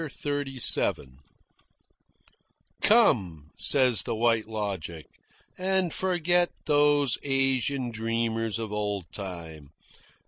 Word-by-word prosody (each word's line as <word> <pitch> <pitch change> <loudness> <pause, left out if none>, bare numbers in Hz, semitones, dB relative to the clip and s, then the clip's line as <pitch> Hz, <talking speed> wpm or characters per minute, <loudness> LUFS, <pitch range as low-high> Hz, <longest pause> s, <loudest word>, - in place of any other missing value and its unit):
CHAPTER 145 -1 -4
XXXVII 115 - +1 1.7
"Come," 95 - +2
says 130 -5 +4
the 115 - -3
White 115 -1 +1
Logic, 95 -7 -5 0.5
"and 190 -2 +1
forget 175 -1 +1 0.2
these 145 -3 +3
Asian 135 -2 0
dreamers 115 0 -2
of 110 -2 -5
old 105 -3 -2
time. 85 -7 -8
115 Hz, 90 wpm, -27 LUFS, 105-145 Hz, 1.7 s, says